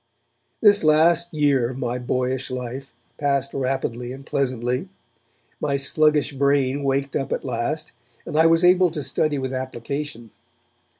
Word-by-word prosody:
This 205 -3 +6
last 165 +3 +3
year 140 -6 +2
of 130 - -7
my 125 -1 -2
boyish 130 +1 -2
life 130 +1 -6 0.3
passed 140 -1 0
rapidly 130 -2 -2
and 135 +1 -9
pleasantly. 125 -2 -2 0.7
My 140 -2 0
sluggish 150 +1 +2
brain 140 0 +1
waked 135 0 -1
up 135 - -2
at - - -2
last 125 +5 -2 0.3
and - - -6
I 160 +1 +5
was 165 +1 +3
able 180 0 +5
to 155 -3 -5
study 150 +2 0
with 130 -1 -3
application. 130 -1 -5
140 Hz, 140 wpm, -23 LUFS, 130-150 Hz, 0.7 s, This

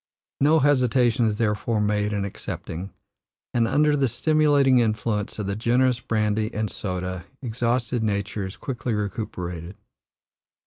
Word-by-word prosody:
No 150 +3 +5
hesitation 125 -4 +3
is 105 - 0
therefore 105 0 0
made 105 0 +1
in 100 -1 -1
accepting; 95 -1 -6 0.6
and, 115 -1 +2
under 150 +3 +3
the 140 -2 +2
stimulating 145 -1 +3
influence 110 -2 -1
of 105 - -3
the 100 0 -2
generous 125 +3 +2
brandy 110 -1 0
and 110 -1 -1
soda, 90 -2 -4 0.2
exhausted 120 0 0
nature 100 -1 -1
is 95 - -10
quickly 120 -4 -3
recuperated. 90 -4 -4
110 Hz, 130 wpm, -24 LUFS, 105-125 Hz, 0.6 s, No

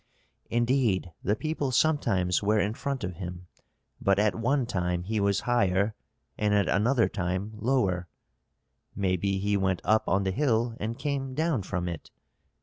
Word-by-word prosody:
"Indeed 120 -6 +1
the 105 - +1
people 155 +1 -2
sometimes 100 - +2
were 105 +1 +2
in 105 +2 0
front 135 0 -3
of 90 -3 -4
him. 90 -1 -6 0.6
But 100 0 +3
at 105 +1 +3
one 125 +3 +1
time 90 -5 -1
he 110 +3 -1
was 100 -1 +2
higher 100 -3 +2 0.5
and 105 -1 +2
at 100 -3 +2
another 115 +4 +3
time 95 +2 -2
lower 105 -6 0 0.4
" - - -50 0.3
"Maybe 95 0 0
he 100 +1 0
went 95 -2 +1
up 110 +4 +2
on 95 +1 +2
the 95 - 0
hill 115 0 +1
and 115 +3 -3
came 135 -1 -3
down 160 -5 +1
from 90 -1 -3
it?" 85 -3 -6
105 Hz, 160 wpm, -28 LUFS, 95-120 Hz, 0.6 s, But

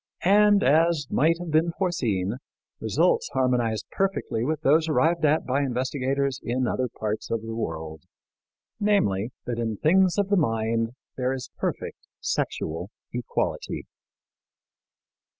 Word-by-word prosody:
And, 205 +1 +5
as 160 +1 +3
might 160 +4 +3
have 175 -2 -6
been 165 +2 +2
foreseen, 115 - 0 0.4
results 475 -1 +2
harmonized 120 -4 +1
perfectly 195 -12 -1
with 155 +3 -1
those 160 +3 +3
arrived 165 +2 +2
at 150 +1 +2
by 135 +2 +1
investigators 135 +1 -1
in 125 +2 -1
other 130 +1 0
parts 110 0 -4
of 115 -1 -1
the 115 0 -5
world 80 -7 -4 0.8
namely, 120 - +2 0.2
that 120 -1 -3
in 110 -2 -2
things 185 - +3
of 200 -1 +1
the 200 - +3
mind 115 -5 0 0.2
there 130 0 0
is 130 -2 -6
perfect - - -4
sexual 85 +4 -2 0.2
equality. 120 -1 -2
130 Hz, 130 wpm, -25 LUFS, 115-165 Hz, 0.8 s, And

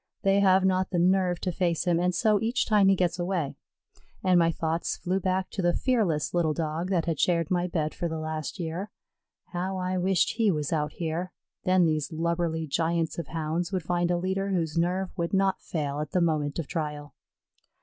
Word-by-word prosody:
They 195 0 +4
have 190 -1 +4
not 185 0 +2
the 180 - -1
nerve 180 0 +2
to 180 - -1
face 170 -1 0
him, 175 -2 +2
and 180 0 +1
so, 210 -1 +3
each 235 +4 +1
time 210 -3 +4
he 195 - +5
gets 180 -1 0
away, 175 -5 -1 0.7
and 185 -1 +4
my 165 0 +3
thoughts 165 0 -2
flew 185 +1 -1
back 185 0 -1
to 195 - -3
the 175 -1 +2
fearless 205 - +1
little 165 -3 +1
Dog 165 +2 -2
that 175 -4 +1
had 165 -3 -2
shared 170 -2 +1
my 180 0 +1
bed 155 -3 -1
for 175 - -2
the 160 - -3
last 155 +2 -4
year. 175 +4 -4 0.6
How 185 +2 -2
I 185 0 -1
wished 185 -1 +2
he 225 -3 +3
was 150 -4 -1
out 150 -2 -1
here, 170 +2 -3 0.3
then 185 -1 +4
these 155 -2 0
lubberly 165 0 -1
giants 165 +3 -1
of 170 - -5
Hounds 165 +2 -2
would 185 -3 -1
find 175 +1 0
a 175 - +2
leader 190 +2 -1
whose 170 -5 -1
nerve 180 +3 0
would 170 +2 -1
not 195 -1 +2
fail 145 -3 -3
at 150 -1 -5
the 180 - +3
moment 150 -4 0
of 165 - -2
trial. 150 -3 -4
175 Hz, 205 wpm, -27 LUFS, 160-185 Hz, 0.7 s, he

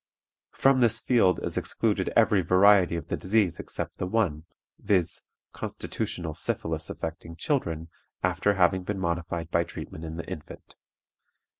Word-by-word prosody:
From 135 -1 +4
this 120 -2 +3
field 110 -7 +3
is - - -3
excluded - - 0
every 100 -3 +5
variety 95 0 +5
of 85 - -5
the - - 0
disease 95 -3 +1
except - - -5
the 90 - -1
one, 90 -7 0 0.3
viz., 95 -5 +1 0.3
constitutional 85 -3 -4
syphilis 80 0 -2
affecting 80 0 -6
children 85 - -1 0.4
after 90 +3 +2
having 95 0 +3
been 100 +2 -3
modified 85 -2 -2
by 85 - +3
treatment 80 -1 -8
in 80 0 -5
the 80 - -5
infant. 75 - -9
90 Hz, 140 wpm, -27 LUFS, 80-100 Hz, 0.4 s, every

